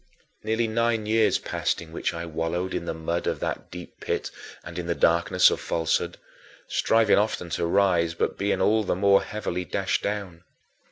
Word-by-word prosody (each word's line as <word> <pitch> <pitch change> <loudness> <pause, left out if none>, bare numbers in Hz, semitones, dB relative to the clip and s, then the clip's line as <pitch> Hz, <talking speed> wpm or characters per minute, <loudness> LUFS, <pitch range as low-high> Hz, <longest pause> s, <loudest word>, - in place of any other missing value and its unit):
Nearly 110 +2 0
nine 115 0 0
years 110 +1 +3
passed - - -2
in 85 -1 -10
which 85 - -2
I 85 0 -5
wallowed 85 +3 -2
in - - -3
the - - -2
mud 85 +2 -2
of - - -1
that - - -3
deep 90 0 -10
pit - - -3 0.3
and 85 +1 -7
in 85 - -5
the 85 - 0
darkness 85 +1 +4
of - - -2
falsehood, 80 -1 -1 0.5
striving 110 -2 +3
often 100 -5 -2
to 85 - -1
rise, 85 -3 +2
but - - -1
being 100 +1 0
all 110 +1 +3
the 95 - 0
more 100 +1 +4
heavily 90 -4 -4
dashed 95 +1 -1
down. 100 -5 -4
90 Hz, 180 wpm, -25 LUFS, 85-105 Hz, 0.5 s, darkness